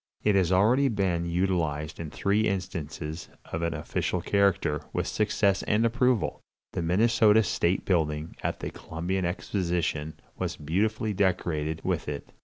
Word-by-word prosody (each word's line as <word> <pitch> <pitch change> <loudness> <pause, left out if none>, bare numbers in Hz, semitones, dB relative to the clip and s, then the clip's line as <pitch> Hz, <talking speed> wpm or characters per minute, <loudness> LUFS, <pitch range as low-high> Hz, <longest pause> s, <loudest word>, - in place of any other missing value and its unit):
It 105 - +4
has 95 -3 +3
already 115 +9 +4
been 95 -7 0
utilized 85 -4 -1
in 80 -2 -5
three 105 +6 +1
instances 80 -4 -4 0.2
of 80 - -2
an 85 -1 -1
official 75 - -2
character, 95 -7 +1
with - - 0
success 100 -2 +1
and 110 +2 +2
approval. 125 0 +1 0.3
The - - -1
Minnesota 110 +5 +4
state 90 -1 0
building 80 -3 0
at - - -2
the - - -4
Columbian 90 +3 -3
Exposition 85 -4 -1 0.2
was - - -3
beautifully 105 +8 0
decorated 85 -5 0
with - - -1
it. 70 -1 -6
90 Hz, 140 wpm, -27 LUFS, 80-105 Hz, 0.3 s, It